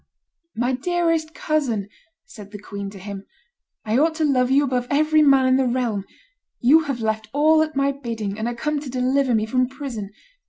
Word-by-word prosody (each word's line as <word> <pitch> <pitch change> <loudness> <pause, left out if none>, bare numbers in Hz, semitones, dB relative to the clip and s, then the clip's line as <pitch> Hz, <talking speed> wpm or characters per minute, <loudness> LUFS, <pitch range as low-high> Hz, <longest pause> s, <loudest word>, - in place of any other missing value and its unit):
"My 245 +3 0
dearest 330 +2 -1
cousin," 255 -10 -1 0.4
said 215 -5 -12
the 205 - -8
queen 200 -1 -7
to 200 - -12
him, 200 +1 -8 0.6
"I 220 +4 +1
ought 320 +2 +2
to 315 -1 0
love 255 -3 +2
you 275 +2 +4
above 250 -3 -1
every 310 +2 +3
man 275 -3 +5
in 260 0 +4
the 265 -1 +1
realm; 235 -5 -1 0.5
you 305 +6 +5
have 270 -5 -3
left 220 -1 -2
all 310 +2 +4
at 315 -1 -2
my 275 0 +2
bidding, 225 -7 -5
and 220 - -2
are 240 - -3
come 300 +5 -2
to 285 -2 -8
deliver 255 0 +1
me 215 0 +1
from 255 +3 +1
prison. 260 -7 -6
255 Hz, 195 wpm, -22 LUFS, 220-290 Hz, 0.6 s, man